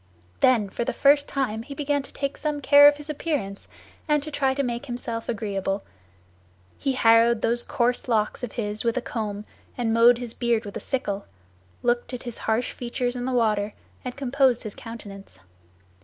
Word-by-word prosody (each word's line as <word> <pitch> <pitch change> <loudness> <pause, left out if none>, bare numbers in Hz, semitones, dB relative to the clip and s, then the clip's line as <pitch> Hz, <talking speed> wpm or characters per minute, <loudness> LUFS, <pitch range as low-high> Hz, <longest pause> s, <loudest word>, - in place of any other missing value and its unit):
Then 235 -5 +4
for 215 - -3
the - - -2
first 285 +1 +4
time 240 -6 -1
he 280 +4 -9
began 285 0 0
to 270 - -12
take 280 0 -3
some 300 -1 -2
care 285 +1 +8
of 290 0 +4
his 295 +1 -9
appearance, 290 -10 -3 0.4
and 300 -2 +2
to 310 - -6
try 270 -2 +1
to 280 - 0
make 240 +2 -3
himself 240 -2 -5
agreeable; 200 -3 -2 1.0
he 275 -2 0
harrowed 230 -1 +4
those 240 +1 +5
coarse 245 +1 0
locks 220 0 0
of 240 - -4
his 210 -2 -3
with 235 +1 0
a - - +1
comb, 210 -2 -4 0.3
and 230 -2 0
mowed 230 +1 +6
his 240 -2 -6
beard 235 -2 0
with 200 - -8
a - - -3
sickle, 205 -7 -3 0.6
looked 240 +1 0
at 245 - -8
his 240 -3 -7
harsh 225 +3 +1
features 245 0 -3
in 245 0 -3
the 260 - -1
water, 215 -4 +1 0.3
and 250 0 -6
composed 265 -2 +2
his 215 -3 -6
countenance. 200 - -10
240 Hz, 185 wpm, -25 LUFS, 220-270 Hz, 1.0 s, care